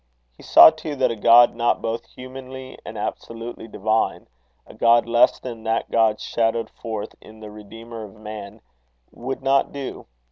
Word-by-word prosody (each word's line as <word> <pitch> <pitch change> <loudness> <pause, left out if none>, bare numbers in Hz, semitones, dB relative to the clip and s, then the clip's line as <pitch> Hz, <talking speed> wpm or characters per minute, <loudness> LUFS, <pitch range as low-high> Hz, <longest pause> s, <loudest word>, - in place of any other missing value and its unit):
He - - -18
saw 80 - +8
too 150 -2 -7
that 130 -3 +1
a - - -3
God 115 +2 +6
not 120 0 0
both 115 +1 -4
humanly 130 0 -10
and - - -8
absolutely 115 0 -6
divine, 110 +1 -1 0.4
a - - -15
God 115 0 +4
less 120 0 +3
than 120 -3 -8
that 115 +1 -1
God 110 -2 +2
shadowed 115 0 -1
forth 110 -3 -6
in 110 0 -15
the 105 -1 -10
Redeemer 115 +2 -10
of 105 - -15
men, 105 -1 -9 0.5
would 130 +2 -6
not 135 0 +2
do. 140 -2 -7
115 Hz, 165 wpm, -22 LUFS, 110-125 Hz, 0.5 s, saw